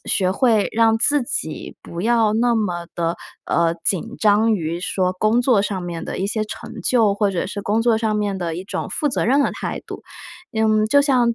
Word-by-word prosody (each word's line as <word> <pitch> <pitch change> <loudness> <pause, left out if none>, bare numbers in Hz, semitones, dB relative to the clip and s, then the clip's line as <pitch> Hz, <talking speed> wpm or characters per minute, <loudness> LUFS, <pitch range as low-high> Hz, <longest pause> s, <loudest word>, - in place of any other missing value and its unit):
学 185 -2 +1
会 225 -3 +2
让 225 0 +3
自 290 +2 +3
己 235 - -4
不 170 - -7
要 225 0 +2
那 235 +2 +2
么 175 -6 -2
地， 170 0 -1 0.3
呃， 170 0 +1
紧 215 +6 -1
张 215 +1 +3
于 170 -1 -3
说 185 -1 0
工 215 +5 +2
作 240 -6 +3
上 195 -3 -3
面 170 -1 -5
的 - - -5
一 190 - -1
些 215 +1 -1
成 230 0 -8
就， 225 -4 +3
或 205 -1 +1
者 180 - -2
是 200 +1 -5
工 215 +3 +1
作 230 -2 +3
上 220 -2 0
面 205 -2 -1
的 170 -3 -3
一 185 - -6
种 - - -4
负 300 - -2
责 - - -1
任 265 +4 +3
的 - - +2
态 - - -5
度。 - - -8 0.5
嗯， 215 -1 +2
就 285 +5 +4
像 245 -4 +2
215 Hz, 230 characters per minute, -21 LUFS, 185-230 Hz, 0.5 s, 就